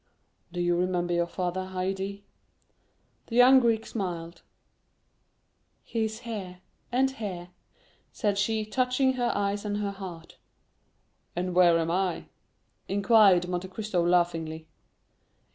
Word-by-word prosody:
'" - - -44
"Do 175 - -5
you 175 0 +2
remember 175 0 0
your 170 0 +1
father, 185 +1 -3
Haydée?" 195 +2 -3 1.0
The 230 - -5
young 255 +2 +8
Greek 230 -3 +1
smiled. 170 -5 -5 1.4
"He 225 -1 -1
is 220 0 -6
here, 190 -6 -6 0.3
and 265 +2 +2
here," 190 -8 -6 0.6
said 205 -3 -1
she, 215 +1 0
touching 255 +3 +1
her 245 -2 0
eyes 200 0 -1
and 205 -1 -2
her 205 -1 -2
heart. 185 -4 -10 1.0
"And 180 +1 -2
where 175 -2 +5
am 165 0 -1
I?" 180 -1 -1 0.6
inquired 195 -3 +4
Monte 180 +1 -3
Cristo 190 -2 -2
laughingly. 165 -2 0
190 Hz, 125 wpm, -27 LUFS, 175-215 Hz, 1.4 s, young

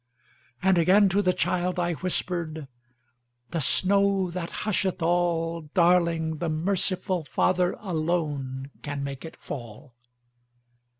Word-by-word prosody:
And 190 -2 +4
again 195 +4 +5
to 195 +2 +2
the 185 -2 +3
child 180 0 0
I 175 0 +1
whispered,"The 130 -7 -6
snow 195 +4 +2
that 170 -1 -4 0.2
husheth 195 -3 0
all, 165 -2 0
Darling, 170 -3 +3
the 170 +1 -2
merciful 185 +2 0
FatherAlone 155 -6 -1
can 145 -1 -4
make 140 -1 -5
it 160 - -8
fall!" 125 0 -8
170 Hz, 105 wpm, -26 LUFS, 145-180 Hz, 0.2 s, again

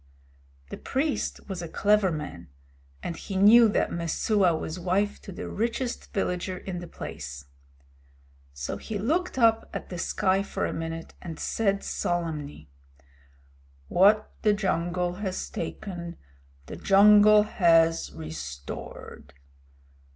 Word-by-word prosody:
The - - -5
priest 280 +2 -2
was 190 -3 -5
a 170 - -5
clever 210 -1 +3
man, 150 - -6 0.6
and 170 - -3
he 195 - -7
knew 220 +4 +7
that - - 0
Messua 170 +2 +1
was 160 +3 -5
wife 190 +4 0
to - - -9
the 185 - -6
richest 235 +3 -3
villager 185 -1 -2
in 180 -1 -6
the 175 - -8
place. 70 - -8 1.1
So 70 0 -5
he 220 - -5
looked 310 - -1
up 225 -2 +3
at - - -6
the 180 - -6
sky 190 +2 +1
for 200 - -3
a - - -3
minute 165 0 -5
and 165 -3 -7
said 200 -3 0
solemnly: 155 - -3 1.2
"What 205 +4 +4
the 210 - +4
jungle 180 -3 -1
has 190 -3 -3
taken 170 0 -6 0.5
the - - -8
jungle 210 +1 +7
has 165 -5 +3
restored. 75 -3 -8
185 Hz, 125 wpm, -27 LUFS, 165-210 Hz, 1.2 s, knew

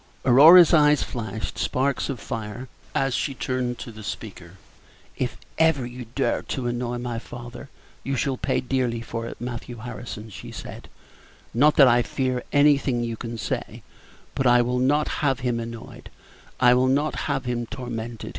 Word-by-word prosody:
Aurora's 155 +7 +8
eyes 150 -2 +5
flashed 110 -3 -5
sparks 135 +2 0
of 135 -4 -3
fire 115 +3 -6 0.3
as 135 -1 +1
she 135 +1 -1
turned 125 -1 -2
upon 115 - -8
the 110 - -10
speaker. 100 -4 -8 0.6
"If - - -3 0.2
ever 160 -6 +3
you 125 -1 -8
dare 135 - +1
to 130 - -4
annoy 120 0 -2
my 120 -1 -4
father, 120 +3 -10 0.3
you 135 - -2
shall 135 +1 0
pay - - -1
dearly 125 -2 -1
for 115 0 -5
it, - - -9
Matthew 120 0 -6
Harrison," 110 -1 -8
she - - -9
said; - - -9 0.6
"not 145 +6 +4
that 140 - +8
I 120 0 +5
fear 130 0 -2
anything 140 -4 +3
you 115 -1 -3
can 115 0 -6
say, 110 - -4 0.5
but 135 - 0
I 120 0 +5
will 125 +1 -1
not 145 +4 +2
have 135 -3 +1
him 120 -2 -1
annoyed 115 0 -8 0.5
I 125 -1 +6
will 125 +1 +3
not 145 +4 +1 0.2
have 135 - -1
him 120 -1 -2
tormented. 120 -2 -6
125 Hz, 165 wpm, -24 LUFS, 115-135 Hz, 0.6 s, Aurora's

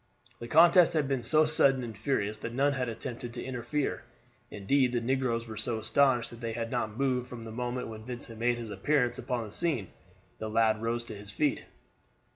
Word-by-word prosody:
The 120 - -7
contest 170 +4 +6
had 150 -3 +1
been 135 -2 0
so 155 +6 +5
sudden 135 -4 +4
and 115 -2 -6
furious 105 -2 -1
that 115 +2 -6
none 140 +2 +3
had 125 -3 -2
attempted 115 +1 -6
to 120 - -5
interfere. 130 +3 -2 0.5
Indeed 125 +5 +1
the 120 - +2
negroes 120 -1 0
were 110 -2 -8
so 115 +1 -2
astonished 125 +2 +2
that 120 0 -11
they 115 -1 -3
had 115 0 -4
not 115 -3 -2
moved 130 -2 0
from 120 -2 -8
the 110 - -8
moment 125 +2 -3
when 110 -1 -8
Vincent 120 -2 -7
made 120 +1 +1
his 115 -3 -6
appearance 125 +4 +1
upon 125 -2 -2
the 105 - -10
scene. 135 - -1 0.5
The 110 - -4
lad 110 0 +2
rose 115 +1 -1
to 110 - -8
his 100 0 -7
feet. 145 +5 0
120 Hz, 205 wpm, -29 LUFS, 115-135 Hz, 0.5 s, contest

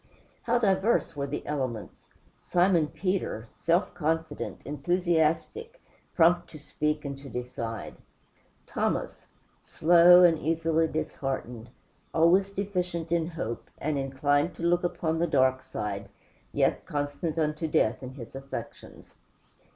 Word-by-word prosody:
How 240 +1 +3
diverse 195 -4 +2
were 140 -1 -2
the 145 - -5
elements! 130 -7 -4 0.3
Simon 175 -3 +3
Peter, 185 - -3
self 170 +3 +1
confident, 160 0 -2
enthusiastic, 175 - 0 0.4
prompt 175 +1 +4
to 155 - -10
speak 150 +1 -2
and 140 0 -4
to 140 0 -10
decide. 115 -3 -5 0.7
Thomas, - - -2 0.3
slow 175 +2 +6
and 165 -3 +5
easily 165 0 +1
disheartened; 135 -6 -4 0.5
always 175 +4 +4
deficient 180 -4 -3
in 170 -1 +1
hope, 120 -9 -5
and 155 +1 -2
inclined 145 +4 0
to - - -8
look 175 +1 +2
upon 165 -2 -1
the 170 - +2
dark 130 -3 +3
side, 130 -5 -5 0.4
yet - - +1
constant 145 +3 -3
unto 155 0 0
death 110 -7 +1
in 130 0 -8
his 120 -5 -10
affections. 135 0 -9
160 Hz, 120 wpm, -28 LUFS, 140-175 Hz, 0.7 s, slow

